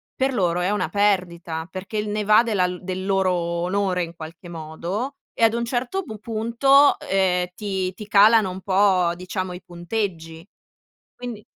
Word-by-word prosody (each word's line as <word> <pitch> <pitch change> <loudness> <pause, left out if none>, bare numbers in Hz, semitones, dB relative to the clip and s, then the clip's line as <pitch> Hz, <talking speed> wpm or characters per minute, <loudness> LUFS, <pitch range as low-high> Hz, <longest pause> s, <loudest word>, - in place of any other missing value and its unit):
per 265 0 0
loro 180 -5 +1
è 180 +3 0
una 205 -3 -1
perdita, 175 -5 0
perché 190 +3 -6
il 210 0 -2
ne 210 0 -1
va 210 +2 +6
della 205 -6 +1
del 185 0 -4
loro 195 -1 +2
onore 180 +2 -1
in 170 0 -8
qualche 165 +2 -10
modo, 170 - -5 0.2
e - - -1
ad 225 -1 +5
un 235 0 -1
certo 255 +10 -2
pu 220 -10 -8
punto, 235 +6 +3
ehm, 185 -2 +1
ti 190 -3 -3
ti 205 +3 -10
calano 210 0 +5
un 185 +1 -7
po', 185 -3 +3
diciamo, 185 +1 -4
i 180 - -9
punteggi. 175 -2 -4 0.7
Quindi 240 -4 -7
190 Hz, 165 wpm, -23 LUFS, 180-215 Hz, 0.7 s, va